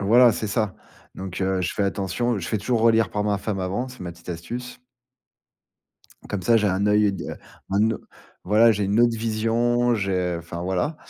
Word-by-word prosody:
Voilà, 115 +4 +6
c'est 110 - -3
ça. 105 -2 -1 0.4
Donc 95 -1 -6
heu, 95 -1 0
je 90 - -1
fais 100 - 0
attention. 100 +4 -1
Je 85 - -5
fais 110 - 0
toujours 115 +3 0
relire 115 0 +4
par 105 0 -2
ma 105 -1 +1
femme 100 -2 -3
avant, 100 +8 -2
c'est 125 0 -13
ma 90 -1 -5
petite 85 +1 -18
astuce 120 +10 -6 1.5
comme 100 -3 -3
ça 115 +5 +4
j'ai 105 -2 +2
un 95 +2 0
œil 105 -1 +3
de 95 - -6 0.4
un 105 +3 +3
o 110 - -2 0.5
voilà, 110 +4 +5
j'ai 105 -1 -1
une 100 +4 +2
autre 120 -1 +3
vision 115 +2 +1
j'ai 95 -4 -1
enfin, 85 0 -7
voilà. 95 - -1
105 Hz, 195 wpm, -24 LUFS, 95-115 Hz, 1.5 s, Voilà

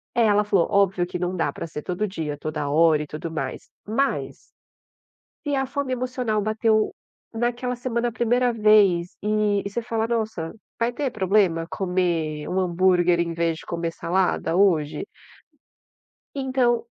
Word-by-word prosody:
É, 235 - +4
ela 210 0 +4
falou: 200 -4 +2
"óbvio 195 -3 +2
que 180 - -4
não 180 +1 -2
dá 170 - 0
pra - - -6
ser 155 -2 -6
todo 185 +6 -2
dia, 155 -6 -4
toda 150 -1 -3
hora 155 0 +4
e 150 - -5
tudo 155 +3 -6
mais". 135 -5 -4 0.2
Mas 270 +6 -1 1.1
se 285 - 0
a 270 -1 +1
fome 270 0 -3
emocional 250 -4 -1
bateu 215 0 +1 0.4
naquela 240 +2 -1
semana 240 -1 -1
a - - -5
1º 245 +1 +2
vez, 210 -6 +4
e 210 -1 +1
e 200 - -4
você 235 - -2
fala: 225 -1 -1
"Nossa, 220 -8 -2 0.3
vai 235 +1 +1
ter 280 +2 -1
problema 190 -5 +2
comer 170 -5 -1
1 185 - -1
hambúrguer 180 -1 +3
em 170 -1 -1
vez 165 -1 -1
de - - -11
comer 170 -1 -3
salada 175 -2 0
hoje?" 180 - +2 1.3
Então 260 -3 +1
200 Hz, 160 wpm, -24 LUFS, 170-235 Hz, 1.3 s, É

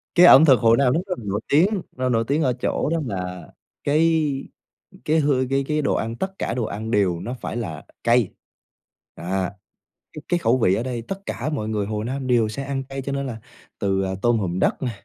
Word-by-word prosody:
Cái 180 - +8
ẩm 160 -3 +9
thực 135 -5 +6
Hồ 115 -1 +5
Nam 130 -1 +3
nó 160 - +2
rất 180 -2 -2
là - - -9
nổi 100 +1 -1
tiếng, 185 +7 +3
nó 130 0 -1
nổi 115 -2 +2
tiếng 145 +3 +1
ở 130 -3 +2
chỗ 125 +3 -1
đó 165 +1 0
là 90 -5 -5 0.4
cái 160 +2 +3 0.8
cái 155 +1 +2
hư 140 -4 +2
cái 135 0 +1
cái 150 0 0
đồ - - +1
ăn, 115 +1 -2
tất 190 +7 -4
cả - - -2
đồ 120 -2 -1
ăn 110 +2 -5
đều 95 -6 +1
nó 120 - -4
phải - - -5
là 90 -11 -5 0.2
cay. 120 -3 +3 0.8
À! 95 +2 -2 0.6
Cái 155 - -8
cái 175 - +1
khẩu 125 -5 +2
vị 95 -6 +3
ở 115 - -2
đây 125 -2 -3
tất 195 0 -6
cả 135 +6 -3
mọi 125 -8 -3
người 105 -2 -1
Hồ 105 0 -3
Nam 130 +3 -4
đều 120 -3 +3
sẽ 125 +6 -5
ăn 135 -1 -3
cay, 135 +1 -6
cho 140 - -4
nên 140 0 -2
là 120 -3 -5 0.4
từ, 95 -1 0
à, 95 - -2
tôm 120 +1 +3
hùm 90 -4 -2
đất - - +1
nè, 125 - -1
125 Hz, 235 wpm, -23 LUFS, 110-140 Hz, 0.8 s, ẩm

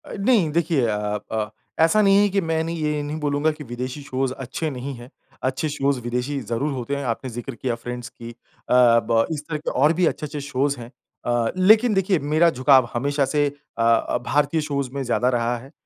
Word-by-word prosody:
अ, - - -9
नहीं 200 -6 +3
देखिए 160 -5 +1
अ 105 -1 -1
अ, 110 -1 -1 0.3
ऐसा 165 +7 +5
नहीं 195 -1 +5
है 205 - +3
कि 195 0 +1
मैं 160 -2 0
नहीं 165 +1 -4
ये 150 -1 0
नहीं 150 +2 -4
बोलूँगा 145 +1 +1
कि 150 0 -9
विदेशी 125 +3 -5
शोज़ 130 -1 -2
अच्छे 135 +5 -3
नहीं 135 0 -5
हैं 120 +1 -12 0.3
अच्छे 130 +4 -1
शोज़ 140 -2 0
विदेशी 125 +4 -2
ज़रूर 120 +6 -1
होते 130 +2 -3
हैं। 140 - -4
आपने 115 +2 -3
ज़िक्र 120 +2 -6
किया 120 +1 -2
फ्रेंड्स 120 +1 -7
की 115 0 -10
अ, - - -16 0.4
ब 115 -2 +4
इस 155 -2 -3
तरह 155 - -1
के 150 - -4
और 150 +5 +3
भी 180 +2 +2
अच्छे-अच्छे 150 -2 -2
शोज़ 140 0 0
हैं 115 0 -9 0.4
अ, 120 -1 +1
लेकिन 215 +5 +5
देखिए 190 -2 +2
मेरा 155 +4 +3
झुकाव 130 -3 +4
हमेशा 140 +3 0
से 145 +2 +1 0.3
अ - - -1
अ, 115 0 +2
भारतीय 150 +2 +1
शोज़ 140 -3 -2
में 140 - -3
ज़्यादा 125 0 +1
रहा 120 -1 0
है। 130 +4 -13
140 Hz, 210 wpm, -23 LUFS, 120-155 Hz, 0.4 s, ऐसा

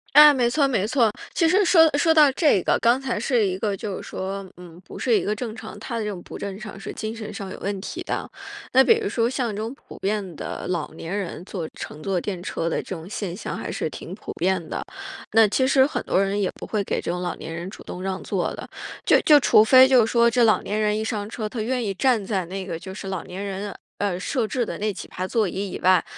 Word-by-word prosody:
哎， 300 0 +10
没 250 -4 +2
错 275 +3 +2
没 215 -7 +1
错。 235 -1 +3 0.2
其 330 - +3
实 390 +5 +4
说 325 -3 +6
说 325 +2 +4
到 300 -3 +7
这 280 - +3
个， - - +2
刚 240 +3 +3
才 260 -4 -1
是 235 0 +2
一 185 -1 -1
个 205 -1 -1
就 195 0 -5
是 - - -10
说 195 0 -5
嗯， 175 -1 -12
不 - - -10
是 250 - 0
一 - - -3
个 210 - 0
正 220 0 -5
常 - - -9
他 235 - -5
的 220 - -2
这 - - -2
种 185 -3 -7
不 - - -9
正 195 -1 -5
常 210 -1 -9
是 195 - -6
精 220 +1 -5
神 215 -2 -7
上 195 -1 -6
有 - - -8
问 200 -1 -3
题 - - -6
的。 - - -3 0.4
那 265 +1 +7
比 455 - +6
如 415 - -1
说 230 -1 +1
像 250 -2 -1
这 205 - -4
种 225 +4 -4
普 - - -14
遍 195 -4 -2
的 - - -5
老 175 -3 -3
年 165 +4 -5
人 180 -3 -5
坐 175 -5 -5
乘 150 - -8
坐 190 +1 -1
电 190 -1 -4
车 170 -2 -2
的 - - -1
这 - - -6
种 165 +2 -9
现 190 -5 -4
象 - - -5
还 - - -5
是 - - -2
挺 - - -8
普 - - -8
遍 185 0 0
的。 - - -4 0.5
那 225 0 +6
其 260 +6 +2
实 265 0 +5
很 290 - -1
多 190 - +2
人 195 +1 0
也 195 - +1
不 - - -10
会 210 -2 -1
给 - - -1
这 - - -4
种 180 +1 -2
老 180 - -2
年 165 - -8
人 170 +2 -5
主 - - -10
动 180 - -8
让 190 0 -3
座 - - -2
的， - - -8 0.4
就 - - +5
就 300 -2 +7
除 215 -5 +6
非 260 +3 +8
就 250 -4 +5
是 - - -4
说 235 0 +5
这 240 +1 +3
老 220 - +4
年 210 +1 -2
人 210 0 +2
一 220 - -2
上 210 -2 -3
车， 220 -1 -4
他 225 +1 -5
愿 245 +2 -1
意 200 - -1
站 230 +1 +2
在 190 -2 -1
那 190 +3 -5
个， 170 -3 -5
就 190 +2 -8
是 195 -1 -7
老 190 -2 -4
年 190 +3 -6
人， 200 +1 -4 0.2
呃， 200 -3 -1
设 245 +2 -1
置 245 +2 -1
的 - - -5
那 210 0 -1
几 - - -9
排 185 - -4
座 215 0 +1
椅 195 +1 -4
以 - - -5
外。 185 -1 +4
210 Hz, 295 characters per minute, -24 LUFS, 190-240 Hz, 0.5 s, 哎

